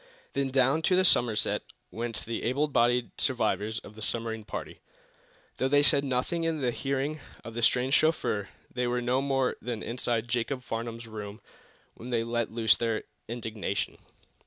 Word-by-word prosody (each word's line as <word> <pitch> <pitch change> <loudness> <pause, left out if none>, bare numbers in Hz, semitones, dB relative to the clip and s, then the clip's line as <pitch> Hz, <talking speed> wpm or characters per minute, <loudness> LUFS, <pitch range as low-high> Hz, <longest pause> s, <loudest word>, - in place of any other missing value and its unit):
Then 140 -1 0
down 135 +4 +3
to 185 - +5
the 185 0 +4
Somerset 120 - +3 0.3
went 115 0 -4
the 115 0 -3
able 140 +6 +1
bodied 120 -3 +2
survivors 110 -3 +1
of 105 - -12
the 110 - -11
submarine 115 0 0
party. 105 - -6 0.8
Though 130 - +1
they 145 +1 +4
said 145 -1 +5
nothing 135 +6 -1
in 165 -1 0
the 125 -3 +1
hearing 140 +4 -2 0.2
of 115 - -8
the 120 - -3
strange 125 +3 +3
chauffeur, 130 -11 +2 0.2
they 125 0 0
were 125 0 +1
no 125 +2 +1
more 135 -2 +1
than 120 -3 -4
inside 120 -1 -1
Jacob's 125 +2 -1
Farnum's 115 0 -4
room 105 -1 -7 0.5
when 120 - -9
they 115 -2 +1
let 115 0 -1
loose 115 0 +4
their 115 -2 -1 0.2
indignation. 110 -4 -3
120 Hz, 165 wpm, -29 LUFS, 115-135 Hz, 0.8 s, to